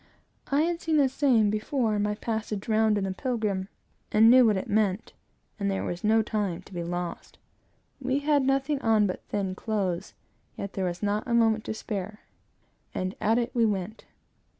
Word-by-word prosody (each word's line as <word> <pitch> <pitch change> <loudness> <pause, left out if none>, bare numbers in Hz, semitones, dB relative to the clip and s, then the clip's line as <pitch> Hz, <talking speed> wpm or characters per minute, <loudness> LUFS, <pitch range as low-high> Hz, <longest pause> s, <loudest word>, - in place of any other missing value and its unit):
I 285 +2 +3
had 340 0 -1
seen 320 -1 +1
the 280 -2 +5
same 255 -6 +3
before, 220 +2 0
in 205 - 0
my 210 0 0
passage 215 -2 -4
round 220 -1 +3
in 200 - -1
the 190 -1 -2
Pilgrim, 210 -4 -2 0.4
and 220 +2 +6
knew 255 -1 +7
what 210 -3 +3
it 190 - -4
meant, 205 -1 0 0.5
and 200 -1 0
that 195 - 0
there - - -2
was 175 - -4
no 220 +1 +4
time 200 -5 -2
to 195 - -16
be 175 -1 -3
lost. 175 0 -5 0.6
We 260 +1 0
had 290 0 +2
nothing 270 +2 0
on 220 -2 +3
but 185 - -3
thin 195 -2 -1
clothes, 190 -3 -3 0.4
yet 200 - -5
there 190 - -2
was 175 +2 -4
not 205 +2 -1
a 235 - +1
moment 225 -2 +3
to - - -3
spare, 210 0 -5 0.7
and 185 +1 -2
at 225 +2 +3
it 245 0 -1
we 235 - +2
went. 210 0 -2
215 Hz, 195 wpm, -27 LUFS, 195-235 Hz, 0.7 s, knew